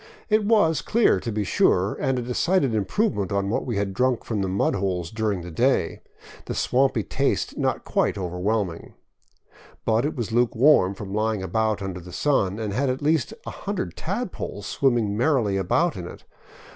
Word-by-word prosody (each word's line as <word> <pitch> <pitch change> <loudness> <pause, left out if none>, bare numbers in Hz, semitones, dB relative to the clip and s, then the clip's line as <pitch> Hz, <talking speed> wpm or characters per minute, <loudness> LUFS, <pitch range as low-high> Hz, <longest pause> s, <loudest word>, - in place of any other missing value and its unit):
It 215 0 +3
was 205 -8 +3
clear, 225 - +3
to 115 - -4
be 105 0 -1
sure, 95 +2 +2
and 130 -1 0
a 125 - -2
decided 135 +3 +1
improvement 110 - 0
on 100 0 0
what - - -1
we 115 -5 -1
had 100 -1 -1
drunk 125 +3 +1
from 110 -3 -2
the 95 - -1
mud 95 +1 +1
holes 90 -3 -2
during 110 -4 -1
the 90 - -8
day, 80 - +1 0.4
the - - -4
swampy 130 -3 +2
taste - - -1
not - - -1
quite - - 0
over 90 -2 -4
whelming. 100 -3 -2 0.9
But 110 +1 +2
it 150 +2 -2
was 120 -4 -3
lukewarm 120 -3 +4
from 100 -1 -7
lying 105 -2 0
out 110 -2 +1
under 95 -2 -4
the 90 +1 -11
sun, 100 -4 +1
and 110 -3 -3
had 135 +4 +1
at 130 +3 -2
least 155 -5 +1
a - - -5
hundred - - -4
tadpoles - - -4
swimming 120 -7 +1
merrily 120 -5 +2
about 95 -2 +1
in - - -6
it. - - -11
110 Hz, 185 wpm, -24 LUFS, 95-130 Hz, 0.9 s, lukewarm